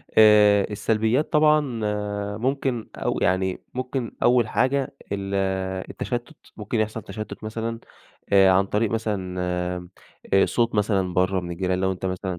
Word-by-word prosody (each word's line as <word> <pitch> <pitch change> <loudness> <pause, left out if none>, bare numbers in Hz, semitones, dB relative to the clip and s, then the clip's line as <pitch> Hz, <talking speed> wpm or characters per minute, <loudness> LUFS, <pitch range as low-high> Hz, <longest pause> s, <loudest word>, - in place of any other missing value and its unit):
آآ 105 -2 +6
السّلبيّات 110 +6 0
طبعًا 150 -5 +3
آآ 105 -1 -3
ممكن 130 -1 -1
أو - - -2
يعني 95 0 +1
ممكن 130 -1 -3
أول 120 -2 +4
حاجة 135 +3 0 0.2
ال 100 -1 -3 0.6
التَّشتُّت، 120 -1 -4 0.2
ممكن 110 +2 -2
يحصَل 110 +1 -1
تَشتُّت 110 +3 -8
مثلًا، 115 +1 -4 0.5
آآ 95 -1 +7
عن 95 +1 +3
طريق 105 +2 0
مثلًا 100 -5 -2 1.0
آمم 95 - +5
صوت 115 -1 0
مثلًا 100 -4 +1
برَّا 95 +1 +2
من 90 -1 -7
الجيران 90 +1 -1
لو 95 0 +1
أنت 95 0 -5
مثلًا 95 -1 -3
105 Hz, 140 wpm, -24 LUFS, 95-115 Hz, 1.0 s, آآ